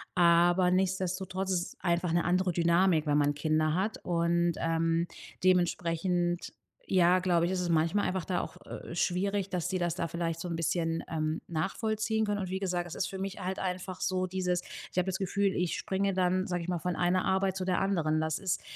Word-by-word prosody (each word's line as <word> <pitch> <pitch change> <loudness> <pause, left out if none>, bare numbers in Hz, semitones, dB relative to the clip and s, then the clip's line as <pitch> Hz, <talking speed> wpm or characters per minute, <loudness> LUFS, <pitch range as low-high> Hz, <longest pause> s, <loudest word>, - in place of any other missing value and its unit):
aber 175 +1 +5
nichtsdestotrotz 190 0 -1
ist 180 -1 +2
es - - -33
einfach 175 -1 +1
'ne 170 0 +2
andere 180 0 +2
Dynamik, 170 -1 +3
wenn 145 0 +3
man 145 0 +2
Kinder 155 +1 +1
hat. 195 +5 -1
Und, 170 0 +1
ähm, 165 +1 +1 0.4
dementsprechend, 175 -1 +1 0.3
ja, 180 0 +4
glaube 175 -2 +2
ich, 180 - -1
ist 180 - -1
es 175 - -2
manchmal 165 +5 +2
einfach 185 -2 -2
da 180 -2 0
auch, - - -8
äh, - - -8
schwierig, 195 +2 0
dass 180 -2 -2
die 185 - 0
das 175 -1 0
da 170 - -2
vielleicht 165 -1 -2
so 175 - -4
'n 165 - -2
bisschen, 165 0 0
ähm, 155 0 -1
nachvollziehen 220 +6 -1
können. 205 -1 -1
Und 185 -2 -3
wie 190 +1 -2
gesagt, 180 -2 -1
es 160 - -7
ist - - -1
für 190 - -6
mich 195 0 -4
halt 185 +1 -3
einfach 185 0 -4
so 185 -1 0
dieses 180 -1 -1 0.3
ich - - -13
habe 180 - +3
das 190 0 -1
Gefühl, 200 0 +1
ich 180 -1 0
springe, 195 -1 -1
dann, 185 0 +1
sage 175 -2 -2
ich 170 - -7
mal, 175 -1 -1
von 180 +2 -2
einer 180 +1 +2
Arbeit 190 0 +1
zu 190 - -2
der 185 -1 +1
anderen. 165 -6 +1
Das 160 -1 -1
ist 190 -3 -1
180 Hz, 210 wpm, -30 LUFS, 170-190 Hz, 0.4 s, aber